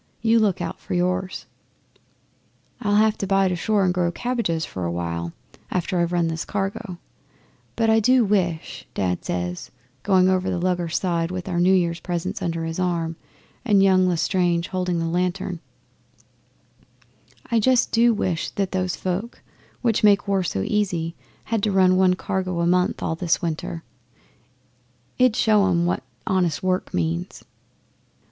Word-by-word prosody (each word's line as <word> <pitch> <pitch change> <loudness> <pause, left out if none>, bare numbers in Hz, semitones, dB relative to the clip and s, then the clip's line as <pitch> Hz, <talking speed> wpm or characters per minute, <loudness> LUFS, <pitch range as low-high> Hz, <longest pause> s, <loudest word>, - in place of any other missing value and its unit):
You 230 0 +4
look 200 -5 +1
out 165 - -5
for - - -5
yours." 185 +1 -1 1.4
'"I'll 205 -1 +1
have 215 +1 +3
to 195 - -2
bide 195 -1 +3
ashore 195 +3 +1
and 180 - +2
grow 175 -1 0
cabbages 225 -8 -1
for 90 - -6
a 85 - -1
while, 85 -1 -3 0.4
after 180 0 -1
I've 170 0 +1
run 175 -2 +1
this 165 0 -3
cargo; 195 -1 -4 0.8
but 225 -1 +1
I 220 0 +5
do 250 +2 +4
wish" 180 -5 -1
Dad 90 -2 -1
says, 90 0 -4 0.3
going 185 -2 +4
over 185 0 +1
the - - -1
lugger's 175 -2 0
side 170 -3 -1
with 180 0 -5
our 175 -2 -1
New 180 +2 +4
Year 170 -2 +2
presents 180 +3 -3
under 165 -1 -2
his 165 +2 -4
arm 170 -2 -1 0.5
and 205 -5 +4
young 185 -1 +4
L'Estrange 175 0 +1
holding 180 -2 -1
the 165 - -1
lantern 180 +1 -1 1.9
"I 230 - +4
just 250 +3 +3
do 235 +1 +4
wish 185 -6 -1
that 195 -2 -1
those 185 -1 -1
folk 190 +6 -4 0.4
which 230 -3 +1
make 205 -1 +4
war 195 -1 +2
so 95 - -2
easy 175 - -1 0.3
had 225 -2 -1
to 210 - +1
run 185 -1 +4
one 185 -1 +4
cargo 185 -2 -2
a - - +1
month 180 +1 +1
all - - 0
this 170 0 0
winter. 165 0 -3 1.4
It 255 -2 +5
'ud - - -7
show 210 -3 +3
'em 170 -1 +2
what 175 - 0 0.2
honest 180 -4 0
work 185 0 0
means." 85 0 -2
180 Hz, 160 wpm, -23 LUFS, 170-195 Hz, 1.9 s, I